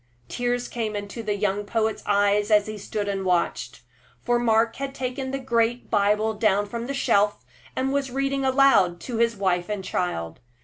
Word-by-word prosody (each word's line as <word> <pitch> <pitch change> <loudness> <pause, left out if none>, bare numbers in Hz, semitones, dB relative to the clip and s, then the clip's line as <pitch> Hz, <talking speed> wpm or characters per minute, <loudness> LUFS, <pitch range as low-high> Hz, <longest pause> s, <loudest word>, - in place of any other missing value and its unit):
Tears 245 0 -1
came 220 -3 -3
into 205 +3 -5
the 210 -2 -1
young 205 0 -1
poet's 220 +1 -1
eyes 205 +1 +2
as 210 -1 +4
he 215 - -6
stood 205 +1 -4
and 195 -1 -2
watched; 175 -10 -1 0.4
for 240 0 +1
Mark 225 -1 +2
had 275 0 -5
taken 260 +1 -3
the 270 - -2
great 240 -2 0
Bible 210 +1 +2
down 205 -2 +2
from 235 +3 -5
the 275 - -3
shelf, 210 -6 +1 0.3
and 265 +1 -1
was 280 -1 0
reading 275 +1 -1
aloud 260 -10 +4
to 240 -3 -4
his 230 0 +2
wife 185 -2 0
and 205 -2 -3
child. 85 - -3
220 Hz, 180 wpm, -24 LUFS, 205-245 Hz, 0.4 s, as